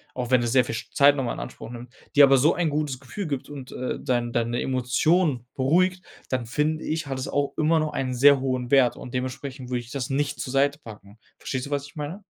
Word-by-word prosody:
auch 125 -2 -3
wenn 125 -2 +4
es 120 - -1
sehr 130 0 +5
viel 115 - -4 0.2
Zeit 140 0 +6
noch 135 - -1
mal 120 - -2
in - - -7
Anspruch - - -8
nimmt, 120 0 -9 0.2
dir 145 - +8
aber 135 0 +5
so 150 +6 +4
ein 170 -3 0
gutes 145 -3 -2
Gefühl 190 +9 -6
gibt 140 -3 -4
und, 135 -3 -9
äh, 125 - -3
dein 120 -2 -1
deine 120 0 -1
Emotionen 130 +2 +1
beruhigt, 180 +7 +2 0.2
dann 130 -3 -1
finde 155 +6 -1
ich, 155 -2 -2
hat 135 - -3
es 130 - -4
auch 145 0 -1
immer 160 +1 +3
noch 155 -1 -2
einen 130 -1 -2
sehr 140 +2 +6
hohen 130 -2 -2
Wert 135 -3 +4
und 125 - -9
dementsprechend 130 0 -5
würde 125 - 0
ich 120 0 -11
das 135 -1 -4
nicht 145 +1 -1
zur 130 - -4
Seite 140 +1 +2
packen. 105 -5 -13 0.2
Verstehst 130 -1 -3
du, 145 - -9
was 140 0 -2
ich 155 - -18
meine? 155 +7 -6
135 Hz, 240 wpm, -25 LUFS, 125-145 Hz, 0.2 s, dir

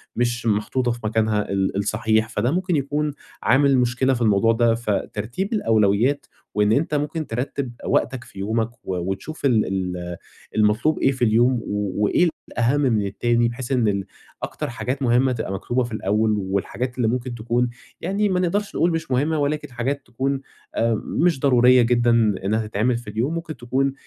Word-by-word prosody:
مش 120 0 -1
محطوطة 115 +4 +1
في 120 - -5
مكانها 110 -1 0
ال 95 0 0
الصحيح، 110 +2 +1
فده 115 +3 0
ممكن 180 +1 0
يكون 145 +1 -1 0.3
عامل 135 +1 +4
مشكلة 125 +2 +2
في 120 - -3
الموضوع 110 0 +4
ده. 115 0 +3
فترتيب 115 - -3
الأولويات 115 - +2 0.3
وإن 105 0 +2
أنت 150 +5 +1
ممكن 150 +2 -2
ترتِّب 125 +2 -3
وقتك 125 -3 0
في 100 - -13
يومك 110 +3 0
و 95 - -3
وتشوف 95 - -4
ال 115 -5 +3
ال 90 -2 -3 0.4
المطلوب 110 +8 +2
إيه 135 - +3
في 130 -2 0
اليوم 120 +3 +4
و 105 -1 -2
وإيه 170 +11 +3 0.2
الأهَم 125 +5 +1
من 115 -7 +2
التاني 120 +4 +1
بحيث 120 +2 -5
إن 125 -4 +2
ال 100 -1 0 0.4
أكتر - - -4
حاجات 130 +3 -3
مهمة 130 +1 +3
تبقى 110 -5 -3
مكتوبة 120 +6 -1
في 120 - -6
الأول 110 +1 +1
والحاجات 100 +6 -3
اللي 120 -3 +1
ممكن 120 +1 -2
تكون 120 +2 0 0.3
يعني 200 +4 0
ما 185 -1 +1
نقدرش 200 +3 -1
نقول 175 - +2
مش 165 -4 -3
مهمة 150 +5 +1
ولكن 145 -1 -1
حاجات 130 +4 -2
تكون 135 +3 -2 0.3
آآ 115 -1 +1
مش 170 -4 +1
ضرورية 125 -2 +5
جدًا 120 0 +3 0.3
إنّها 110 +2 0
تتعمل 110 +4 +1
في 120 -3 -9
اليوم، 115 +9 -1
ممكن 165 -2 -5
تكون 130 +3 0
120 Hz, 170 wpm, -22 LUFS, 110-135 Hz, 0.4 s, ضرورية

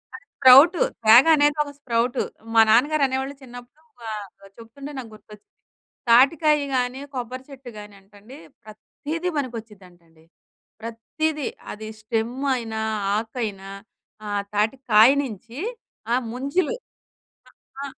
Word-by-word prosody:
అది 285 - -13
స్ప్రౌటు. 280 +6 +7 0.2
తేగ 230 +5 +8
అనేది 290 0 +2
ఒక 285 - -10
స్ప్రౌటు. 245 -1 -1 0.3
మా 225 - +7
నాన్నగారనేవొళ్ళు 270 +2 +1
చిన్నప్పుడు 245 +4 -13 0.2
వా 225 - -7 0.5
చెప్తుంటే 235 +6 -11
నాకు 240 -4 -8
గుర్తొచ్చింది. 210 -1 -17 0.6
తాటికాయ 300 +5 +5 0.2
గానీ, 250 +1 -1
కొబ్బరి 255 0 -6
చెట్టు 270 -2 -11
గానంటండి, 205 +3 -14 0.3
ప్రతీదీ 300 +10 -6
పనికొచ్చిద్దంటండి. 190 - -8 0.6
ప్రతీదీ. 280 +7 -3 0.2
అది 215 +1 -8
స్టెమ్ 225 +2 -2 0.2
అయినా, 225 -3 -4 0.4
ఆకయినా 215 -4 -5 0.6
ఆహ్, 205 -1 -2
తాటికాయ 220 +1 +4
నించి 235 -2 -8 0.6
ఆ - - +4 0.2
ముంజులు 280 - -1 0.7
ఆ - - -18 0.3
ఆ - - -4
245 Hz, 105 wpm, -23 LUFS, 220-275 Hz, 0.7 s, తేగ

